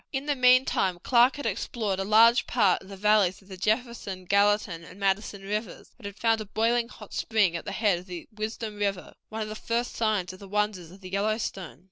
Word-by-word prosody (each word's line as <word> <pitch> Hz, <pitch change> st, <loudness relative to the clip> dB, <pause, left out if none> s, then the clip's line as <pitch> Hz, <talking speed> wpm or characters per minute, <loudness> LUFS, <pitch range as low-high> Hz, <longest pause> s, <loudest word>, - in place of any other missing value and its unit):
In 270 Hz, 0 st, -3 dB
the 295 Hz, -, +1 dB
meantime 250 Hz, -8 st, +3 dB
Clark 245 Hz, +1 st, +4 dB
had 285 Hz, -, -7 dB
explored 210 Hz, -1 st, -2 dB
a -, -, 0 dB
large 225 Hz, +4 st, +5 dB
part 205 Hz, -7 st, +2 dB
of 190 Hz, -, -15 dB
the 195 Hz, -, -9 dB
valleys 205 Hz, -2 st, +3 dB
of 190 Hz, -, -22 dB
the 190 Hz, -, -7 dB
Jefferson, 215 Hz, -2 st, -2 dB
Gallatin, 200 Hz, -3 st, +2 dB
and 180 Hz, +3 st, -13 dB
Madison 195 Hz, 0 st, -1 dB
Rivers, 210 Hz, +3 st, -5 dB
and 205 Hz, -, -7 dB
had 200 Hz, -1 st, -9 dB
found 225 Hz, +1 st, +1 dB
a -, -, -6 dB
boiling 230 Hz, +3 st, 0 dB
hot -, -, -13 dB
spring 205 Hz, -6 st, +1 dB
at 170 Hz, -, -5 dB
the -, -, -4 dB
head 205 Hz, -5 st, +1 dB
of 180 Hz, -, -13 dB
the 175 Hz, -2 st, -8 dB
Wisdom 215 Hz, 0 st, -5 dB
River, 200 Hz, -2 st, -2 dB, 0.2 s
one 220 Hz, 0 st, -4 dB
of 215 Hz, -, -6 dB
the -, -, -5 dB
first 235 Hz, +2 st, -2 dB
signs 210 Hz, -5 st, 0 dB
of 185 Hz, -, -13 dB
the 200 Hz, -, -11 dB
wonders 205 Hz, -4 st, -1 dB
of 190 Hz, +3 st, -15 dB
the 185 Hz, -1 st, -10 dB
Yellowstone. 200 Hz, -, -2 dB
210 Hz, 220 wpm, -27 LUFS, 190-225 Hz, 0.2 s, large